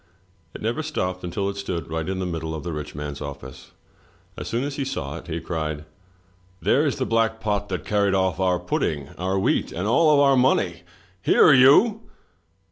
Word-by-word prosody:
It - - -8
never 115 +7 -1
stopped 90 -13 -3
until 95 +3 -2
it 100 0 -4
stood 85 -5 -4
right 80 +1 -2
in 95 - -2
the 95 - -2
middle 80 -2 -4
of 75 - -6
the 85 - -4
rich 75 -1 -6
man's 75 0 -6
office. 70 -2 -8 0.7
As - - -7
soon 120 +3 -1
as 140 0 -4
he 140 - -1
saw 75 - -4
it, - - -11
he 85 0 -3
cried: 75 -3 -4 0.7
"There 150 +8 +2
is 140 - -1
the 130 - -2
black 115 -1 +1
pot 105 -2 -2
that 90 -2 -4
carried 100 -2 +1
off 95 -2 0
our 90 -1 +2
pudding, 75 -3 -2
our 95 +2 -1
wheat, 95 - 0
and 90 +4 -4
all 150 +5 +4
our 140 -1 +5
money! 100 -10 +2 0.2
— 95 0 -32
Here 155 - +6
you! 150 - +6
95 Hz, 200 wpm, -23 LUFS, 80-120 Hz, 0.7 s, Here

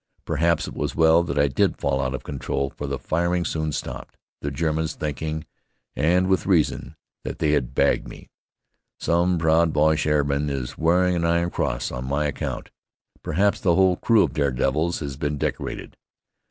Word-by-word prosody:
Perhaps 85 +1 +1
it - - -7
was - - -3
well 80 +1 +5
that 75 -4 -3
I 70 - +4
did 70 - +1
fall 70 -1 0
out - - -1
of - - -7
control, 70 -1 -3
for 75 - -6
the 70 0 -2
firing 85 +4 0
soon 80 -1 -2
stopped, 60 -4 -6 0.2
the 70 - -2
Germans 80 +2 -1
thinking, 75 0 -4 0.5
and 90 +5 +2
with 95 0 +1
reason, 85 -6 +1 0.3
that - - -5
they 75 -2 +1
had 70 -5 0
bagged - - +2
me. - - -11 0.7
Some 85 +1 +2
proud 80 0 +3
Boche 75 +1 +2
airman 75 -1 +1
is 65 -3 -4
wearing 90 +3 +2
an 85 - -1
iron 85 +1 +1
cross - - -2
on 65 0 -5
my 75 +2 0
account. 75 - -4 0.5
Perhaps 100 +6 +1
the 85 -3 +2
whole 95 0 +4
crew 115 -3 +4
of - - -2
dare 70 -2 +1
devils 75 +7 0
has 70 -3 -5
been 75 0 -2
decorated. - - -4
80 Hz, 180 wpm, -24 LUFS, 70-85 Hz, 0.7 s, well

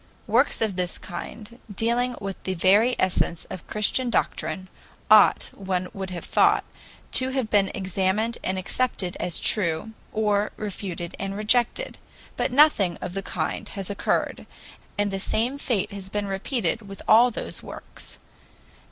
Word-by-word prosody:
Works - - +2
of 210 -4 0
this 180 -1 -1
kind, 210 +6 -8
dealing 240 +4 0
with 195 -1 -6
the 190 - -3
very 205 +8 +4
essence 180 -2 0
of 185 - -8
Christian 230 +4 +1
doctrine, 175 -4 -1 0.4
ought, 215 -1 +6
one 185 -2 -3
would 190 -1 -5
have 180 -2 -6
thought, - - +3 0.5
to 260 0 +5
have 260 -4 -2
been 200 -2 +4
examined 195 +4 0
and 190 0 -1
accepted 190 -1 -1
as 175 - -1
true, 170 0 +2 0.2
or 210 -1 +1
refuted 185 -4 -5
and 195 0 -3
rejected. 240 - +1 0.4
But - - -1
nothing 250 - +4
of 180 - -5
the 195 - -2
kind 205 +2 -3
has 195 -1 -5
occurred, 200 - -1 0.5
and 205 0 +1
the 195 - -2
same 240 +7 0
fate 225 -8 0
has 195 -1 -7
been 205 +1 -2
repeated 200 +1 -2
with 195 - -9
all 235 +3 +7
those 240 - -4
works. - - -10
200 Hz, 150 wpm, -25 LUFS, 185-225 Hz, 0.5 s, all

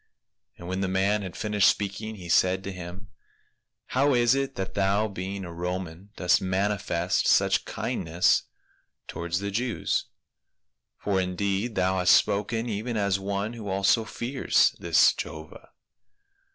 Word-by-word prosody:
And 85 - -10
when 95 +1 -2
the 95 - 0
man 95 +3 +1
had 95 -2 -7
finished 105 -2 +3
speaking 105 +2 -3
he 90 -4 -10
said 95 +2 +3
to 100 - -5
him, 90 +2 -9 0.4
" - - -50
How 140 +1 +3
is 120 0 +4
it 135 0 -1
that 95 0 -4
thou 100 +2 +1
being 95 0 -5
a 85 - -8
Roman 90 +1 -5
dost 90 -1 +2
manifest 95 -2 0
such - - +3
kindness 85 +2 0 0.6
towards 85 +2 -3
the 100 0 -3
Jews? 120 +3 -1 0.9
for 95 -2 0
indeed 100 +4 -2
thou 95 0 +1
hast 90 0 +6
spoken 110 +3 0
even 110 +2 -3
as 100 -2 +1
one 100 +3 -3
who 110 -4 -7
also 100 +4 +2
fears 120 +5 +1
this - - +4
Jehovah." - - -8
100 Hz, 145 wpm, -26 LUFS, 95-105 Hz, 0.9 s, hast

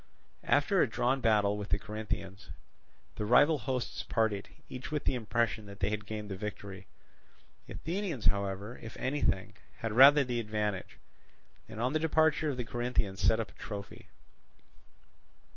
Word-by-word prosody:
After - - +3
a - - +3
drawn 130 +2 +1
battle 105 -3 +3
with 100 - -6
the - - +3
Corinthians, 105 -3 -5 0.7
the - - -2
rival 145 +6 +5
hosts 125 +1 -3
parted, 110 -3 -1 0.2
each 125 - -7
with 150 -2 -1
the - - +1
impression 115 -2 -1
that 100 0 -11
they 100 +1 0
had 105 0 -4
gained 105 -1 -5
the - - -2
victory. 100 -1 -7 0.8
The - - -8
Athenians, 170 - -3
however, 100 +3 0
if 110 - -9
anything, 115 -6 -1 0.2
had 115 - -3
rather 140 +5 +8
the 125 -2 -2
advantage, 105 -3 -3 0.7
and 110 -1 -8
on 125 +4 0
the 155 - +2
departure 160 -1 +2
of 135 - -3
the 125 - -3
Corinthians 120 -5 -2
set 105 +4 +4
up 115 - -3
a - - -24
trophy. 105 -1 -7
110 Hz, 160 wpm, -31 LUFS, 105-130 Hz, 0.8 s, rather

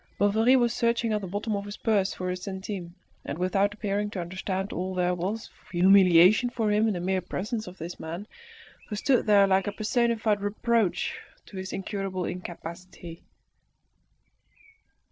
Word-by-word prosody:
Bovary 220 +5 +4
was 240 -2 +3
searching 235 -1 +1
at 210 - 0
the 190 - -5
bottom 205 +4 -2
of 200 0 -4
his 205 0 -7
purse 205 -4 +1
for 185 0 -3
a - - -2
centime, 190 -2 -6 0.3
and 145 - -5
without 195 +3 +1
appearing 205 -1 -2
to 205 - -5
understand 185 +2 -3
all 185 +1 -3
there 180 0 +1
was 190 +6 -4
of - - -23
humiliation 185 +4 +6
for 225 -3 -1
him 210 +2 +3
in 215 - 0
the - - -3
mere 185 +1 0
presence 215 +5 -4
of 180 +1 -10
this 170 +2 -7
man, 170 +5 -6 0.6
who 210 - -3
stood 250 +3 +2
there 205 -1 +6
like 190 0 +2
a - - 0
personified 220 0 +1
reproach 215 0 0 0.3
to - - -14
his 190 0 -5
incurable 195 -2 -3
incapacity. 175 -1 -8
195 Hz, 165 wpm, -27 LUFS, 185-215 Hz, 0.6 s, humiliation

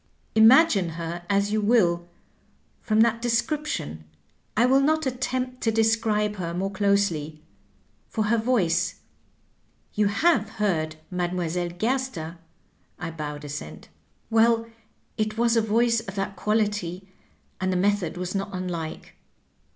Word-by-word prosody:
Imagine 220 - +6
her 170 +1 -5
as 200 +1 +2
you 215 0 +1
will 180 -6 +2 0.7
from 215 0 +2
that 230 0 +3
description; 240 - -1 0.5
I 235 - +5
will 265 +2 +5
not 315 +2 +2
attempt 255 0 -2
to 225 - +2
describe 220 -1 +1
her 170 -2 -4
more 195 +2 -2
closely. 190 -7 0 0.7
For 220 - -1
her 225 +2 +2
voice 185 -7 +1 0.5
— - - -39
^you 210 -1 +3
have 220 0 +2
heard 160 -7 0 0.2
Mdlle. 175 -1 -2
Gerster? 220 -8 -2 0.3
" - - -39
(I 175 -1 -4
bowed 150 -2 -6
assent) 140 - -8 0.2
— - - -41
well, 225 0 +4 0.5
it 215 0 -1
was 235 0 +3
a 230 - +4
voice 230 +2 +2
of 195 -3 -8
that 195 0 -3
quality, 205 -3 -1 0.5
and 185 0 0
the 185 - +1
method 200 -2 0
was 180 0 -4
not 195 0 -2
unlike. 175 -4 -5
205 Hz, 135 wpm, -25 LUFS, 175-230 Hz, 0.7 s, Imagine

